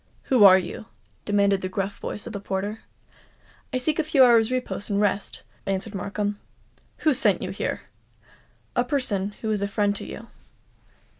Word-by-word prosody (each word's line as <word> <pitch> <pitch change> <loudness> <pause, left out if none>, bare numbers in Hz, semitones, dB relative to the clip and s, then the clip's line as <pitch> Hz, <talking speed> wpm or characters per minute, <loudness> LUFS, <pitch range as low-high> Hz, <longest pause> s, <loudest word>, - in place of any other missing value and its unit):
"Who 225 -5 +7
are 190 -1 +9
you?" 185 +4 -5 0.4
demanded 200 -1 +2
the 185 - -3
gruff 195 +1 -3
voice 205 - -4
of 235 - -7
the 200 - -4
porter. 200 +2 -3 0.9
"I 255 - 0
seek 300 +5 0
a - - +3
few 295 -3 +5
hours' 235 -2 +5
repose 250 -5 -2
and 200 -1 +1
rest," 205 -1 -1 0.2
answered 195 +2 -2
Markham. 205 +1 -3 0.7
"Who 305 - +5
sent - - +2
you - - -3
here?" - - -3 0.9
"A 245 - +3
person 240 -7 -1
who 220 - -1
is 210 -2 0
a 200 - 0
friend 205 0 0
to - - -7
you." - - -8
205 Hz, 170 wpm, -25 LUFS, 200-240 Hz, 0.9 s, are